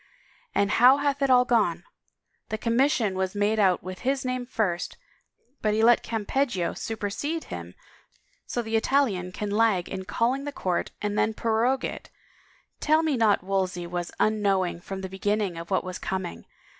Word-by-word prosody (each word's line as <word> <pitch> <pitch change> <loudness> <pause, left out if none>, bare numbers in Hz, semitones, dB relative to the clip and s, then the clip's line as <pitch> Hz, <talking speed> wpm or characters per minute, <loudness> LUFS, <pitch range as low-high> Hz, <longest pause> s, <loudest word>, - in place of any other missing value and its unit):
And 200 0 +2
how 250 +5 +6
hath 285 -1 0
it 275 - +2
all 250 -1 +6
gone? 190 -9 +1 0.7
The 220 - -2
commission 230 -2 +2
was 190 +1 -2
made 205 +2 +1
out 185 -4 +3
with 185 +1 -7
his 270 +1 -1
name 255 -1 -2
first 195 -8 -2 0.6
but 215 -1 +1
he 220 - +2
lets 235 +1 +6
Campeggio 225 -3 0
supersede 225 +9 -3
him 85 +1 -8 0.7
so 240 - -2
the 220 0 -2
Italian 220 -7 +1
can 205 +2 -4
lag 210 -4 +2
in 190 -1 -5
calling 245 +7 0
the 290 - -3
court 185 -10 -2
and 210 0 0
then 220 0 +1
prorogue 230 +4 +1
it - - -6 0.4
— - - -32 0.3
tell 310 +1 +3
me 310 -3 +1
not 220 -5 +3
Wolsey 185 -2 -1
was 175 0 -4
unknowing 195 -5 +1
from 190 +1 -6
the 190 - -4
beginning 200 0 -1
of 170 0 -7
what 190 - +1
was 185 0 -6
coming! 190 - -4
210 Hz, 170 wpm, -26 LUFS, 185-245 Hz, 0.7 s, how